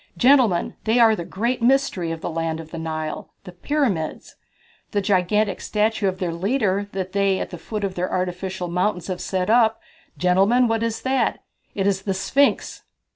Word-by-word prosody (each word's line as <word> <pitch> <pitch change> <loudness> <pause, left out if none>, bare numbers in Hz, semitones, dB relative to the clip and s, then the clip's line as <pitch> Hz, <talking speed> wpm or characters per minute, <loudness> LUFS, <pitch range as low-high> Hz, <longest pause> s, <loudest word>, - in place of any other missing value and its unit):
Gentlemen, 245 -9 +4
they 225 +2 +2
are 225 -2 +6
the 175 - -5
great 235 +8 -2
mystery 240 -9 +2
of 165 0 -5
the - - -3
land 165 0 -2
of 160 -1 -10
the 165 - -6
Nile, 155 -1 -4
the 180 - -10
Pyramids. 195 - -2 0.6
The 205 - +2
gigantic 200 +1 +1
statue 215 -1 0
of 185 -1 -1
their 180 -3 -2
leader 200 +1 0
that 190 -1 -3
they 195 -1 +2
at - - -4
the 175 - -7
foot 215 -2 -5
of 195 -2 -1
their 180 0 -3
artificial 185 0 -3
mountains 180 0 -1
have 180 -1 -3
set 185 +2 -1
up 225 -1 +4 0.4
gentlemen, 195 +8 +3
what 225 0 0
is 230 -1 -2
that? 265 0 0 0.3
It 195 - -1
is 195 -1 +1
the 195 -1 -2
Sphinx!" 280 +9 +1
195 Hz, 180 wpm, -22 LUFS, 180-225 Hz, 0.6 s, are